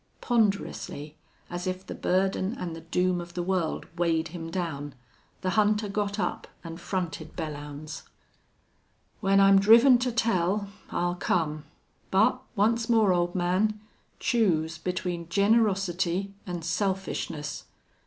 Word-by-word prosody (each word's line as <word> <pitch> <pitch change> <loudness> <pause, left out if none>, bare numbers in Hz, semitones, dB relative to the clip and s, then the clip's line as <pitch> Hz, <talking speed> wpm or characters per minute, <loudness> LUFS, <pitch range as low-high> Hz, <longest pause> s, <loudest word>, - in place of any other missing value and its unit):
Ponderously, 200 - -1 0.3
as 175 +1 -5
if 185 +1 -3
the - - -6
burden 190 +3 0
and 170 -2 -4
the 165 - -9
doom 180 +2 0
of 175 0 -11
the 175 - -1
world 180 -3 -1
weighed 165 -2 +1
him 165 -1 -6
down, 150 -5 -4 0.5
the 185 - 0
hunter 210 0 +2
got 205 0 -2
up - - -2 0.2
and 165 +1 -8
fronted 175 -3 -4
Belllounds. 150 -1 -6 1.2
"When 195 0 +3
I'm 195 0 +7
driven 235 +5 +7
to 250 0 0
tell 200 -3 +1 0.2
I'll 175 0 0
come.... 155 -4 -1 0.4
But, - - +3
once 225 +3 +2
more, 220 -5 +4
old 175 0 0
man, 185 +4 +1 0.4
choose 165 -9 +1
between 175 -1 -3
generosity 195 -2 +2
an' 175 -2 -4
selfishness. 170 -4 -2
180 Hz, 125 wpm, -27 LUFS, 165-200 Hz, 1.2 s, I'm